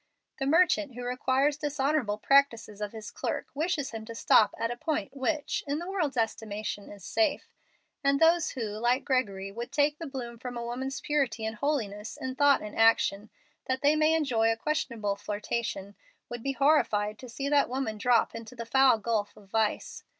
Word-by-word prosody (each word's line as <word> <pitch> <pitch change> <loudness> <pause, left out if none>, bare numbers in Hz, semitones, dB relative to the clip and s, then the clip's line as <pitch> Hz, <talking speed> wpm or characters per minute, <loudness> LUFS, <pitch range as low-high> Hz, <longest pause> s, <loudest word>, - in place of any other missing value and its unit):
The 270 - -1
merchant 315 -4 +3
who 245 - -6
requires 260 +3 +1
dishonorable 290 -6 0
practices 230 -5 +2
of 210 -1 -3
his 220 -2 -8
clerk - - -3
wishes 305 -1 -1
him 225 -1 -6
to 230 0 -8
stop 220 - +4
at 230 +1 -1
a - - -3
point 280 -4 -3
which, 295 +2 -1
in 285 +1 -1
the 345 +2 -5
world's 340 -9 -1
estimation, 215 -2 -3
is 200 -3 -12
safe. 320 -4 0 0.5
And 275 0 +3
those 330 0 +4
who, 260 - -6
like 235 +5 0
Gregory, 200 -8 -1
would 235 +4 -6
take 290 +1 +1
the 330 - -5
bloom 240 -4 -6
from 245 0 -6
woman's 245 +3 -4
purity 265 -7 0
and 220 0 -4
holiness 215 -7 -2
in 260 0 -4
thought 285 +1 +4
and 210 - -7
action, 220 -2 +3 0.4
that 260 +1 -1
they 290 +2 +5
may 310 +1 +3
enjoy 235 -8 +2
a 225 - -1
questionable 230 -7 -1
flirtation, 205 -1 -4 0.4
would 240 -1 -6
be 275 +3 -2
horrified 215 -8 +2
to 255 - -10
see 275 +4 -4
that 285 -2 +3
woman 250 -4 -3
drop 240 +1 +3
into 230 +2 -9
the 230 -1 -6
foul 265 0 +5
gulf 215 -1 -2
of 200 -2 -17
vice. 220 0 -1
245 Hz, 185 wpm, -29 LUFS, 220-285 Hz, 0.5 s, they